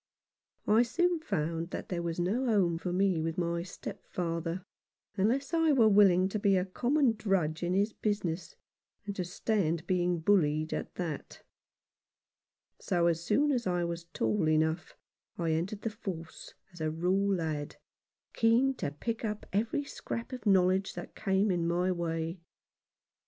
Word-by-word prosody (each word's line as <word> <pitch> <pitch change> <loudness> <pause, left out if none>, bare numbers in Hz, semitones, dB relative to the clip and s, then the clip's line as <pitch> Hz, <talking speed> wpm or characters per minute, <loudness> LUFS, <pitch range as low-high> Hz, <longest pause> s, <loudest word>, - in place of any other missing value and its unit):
I 215 +2 +5
soon 345 +8 +1
found 165 - -2
that - - -6
there 175 -2 -2
was 170 0 -3
no 215 +9 0
home 185 -7 +2
for 180 - -3
me 185 -2 +2
with 165 0 -2
my 170 -1 0
stepfather, 170 -1 -4 0.5
unless 250 - +1
I 325 -2 +4
were 235 -5 +5
willing 190 -3 +5
to 215 - -2
be 195 -1 +3
a 180 - +1
common 250 +6 +2
drudge 190 -8 0
in 175 +1 0
his 205 +3 +1
business, 180 -6 -2 0.5
and 200 -1 -4
to 185 - -1
stand 175 -2 -1
being 180 -1 +1
bullied 155 -4 +2
at - - -4
that; 165 -5 -5 1.4
so 175 -2 +1
as 170 -1 +1
soon 290 +10 +2
as 245 -6 0
I 175 -1 +1
was 170 0 -4
tall 115 -2 0
enough 160 +2 0 0.4
I 165 -2 0
entered 180 +6 -2
the 225 - -1
force 175 -6 -7 0.2
as 175 - -10
a 155 - +1
raw 165 +3 -1
lad, 170 -7 0 0.6
keen 235 +4 +3
to - - -2
pick 225 +12 -4
up 210 -1 -3
every 225 +8 0
scrap 245 -3 -6
of 240 -4 -5
knowledge 190 0 +3
that - - -7
came 195 +1 +1
in 170 -2 0
my 175 +2 +1
way. 165 0 -2
185 Hz, 155 wpm, -31 LUFS, 170-215 Hz, 1.4 s, I